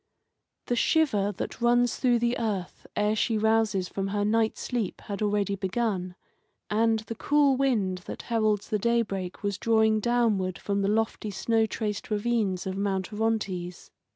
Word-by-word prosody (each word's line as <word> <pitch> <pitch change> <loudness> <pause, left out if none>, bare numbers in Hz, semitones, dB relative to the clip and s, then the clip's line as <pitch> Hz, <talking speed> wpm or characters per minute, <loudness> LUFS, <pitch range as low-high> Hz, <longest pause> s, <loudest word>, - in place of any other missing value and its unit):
The 245 - 0
shiver 235 -8 +2
that 190 - -6
runs 240 0 +3
through 245 -2 +3
the 235 +1 +1
earth 200 -6 -3
ere 210 +1 +1
she 220 0 +1
rouses 220 -3 +2
from 195 +1 -3
her 205 +1 -1
night 220 +1 +1
sleep 235 -7 -3
had 200 0 -6
already 205 -1 +1
begun, 190 -2 -2 0.6
and 225 +1 +3
the 225 - -6
cool 285 +3 +3
wind 220 -9 +1
that - - -6
heralds 215 -3 0
the 215 -2 0
daybreak 200 -5 -1
was 200 -1 -2
drawing 220 -1 +3
downward 215 -6 +1
from 200 0 -1
the 195 - +1
lofty 215 0 0
snow 225 +3 +1
traced 210 -2 -4
ravines 210 -3 0
of 190 0 -3
Mount 195 0 -2
Orontes. 200 -5 -2
215 Hz, 155 wpm, -27 LUFS, 200-230 Hz, 0.6 s, runs